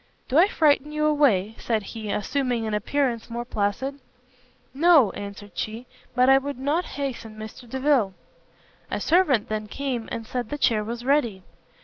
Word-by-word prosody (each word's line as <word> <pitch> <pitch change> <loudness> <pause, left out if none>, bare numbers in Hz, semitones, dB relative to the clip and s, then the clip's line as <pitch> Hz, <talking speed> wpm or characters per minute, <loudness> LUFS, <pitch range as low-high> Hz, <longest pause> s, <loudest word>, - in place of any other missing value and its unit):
"Do 275 +5 +4
I 365 - +7
frighten 300 -5 +2
you 305 0 0
away?" 255 -10 +3
said 220 -3 -1
he, 215 0 -7
assuming 245 +2 -1
an 215 - -2
appearance 235 +2 -1
more 235 +1 -4
placid. 240 +5 -2 0.7
"No," 295 - +5
answered 205 0 -8
she, 225 +3 -4 0.3
"but 250 0 +4
I 270 0 +7
would 280 -1 -5
not 290 +7 0
hasten 240 -6 -4
Mr 220 +3 -9
Delvile." 260 -7 +1 0.7
A - - -2
servant 310 - +3
then 215 0 -3
came, 250 -2 -3
and 230 - -4
said 240 -1 -4
the 295 - -3
chair 220 -6 +2
was 235 +2 -6
ready. 240 -9 +1
245 Hz, 160 wpm, -25 LUFS, 215-285 Hz, 0.7 s, I